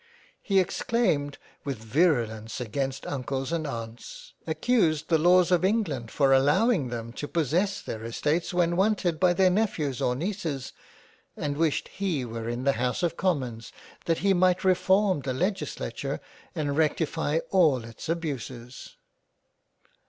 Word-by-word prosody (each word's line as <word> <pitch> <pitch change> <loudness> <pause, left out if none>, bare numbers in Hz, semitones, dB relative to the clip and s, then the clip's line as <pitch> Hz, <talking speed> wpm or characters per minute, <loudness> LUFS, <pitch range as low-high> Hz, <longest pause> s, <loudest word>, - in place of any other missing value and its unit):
" - - -30
He 195 -3 +2
exclaimed 180 - 0 0.3
with 140 -3 -3
virulence 115 -3 0
against 135 +3 -3
Uncles 135 +1 -3
and 165 -2 -1
Aunts; 115 -2 -8
Accused 160 -4 +1
the 165 -2 +4
laws 180 +1 +5
of 180 0 +3
England 185 - 0
for 135 0 +3
allowing 145 - +3
them 115 -1 -5
to 145 - -5
possess 170 +6 0
their 110 0 -6
Estates 150 +10 -1
when 175 -1 +1
wanted 185 -4 +1
by 180 -1 +4
their 185 +1 +4
Nephews 165 - 0
or 125 - +1
Neices, 165 -4 -3 0.7
and 145 -1 -2
wished 160 -1 0
he 180 -10 -2
were 115 0 -5
in 120 +2 -3
the 140 - +4
House 125 +7 0
of 170 -1 0
Commons, 130 -12 -2 0.3
that 165 -1 +1
he 195 - +5
might 180 0 +3
reform 190 -1 +3
the 130 -1 -3
Legislature, 190 +7 -3 0.4
and 145 -3 -1
rectify 160 0 0
all 155 -10 +4
its 115 +6 -9
abuses." 130 -7 -5
155 Hz, 145 wpm, -27 LUFS, 130-180 Hz, 0.7 s, laws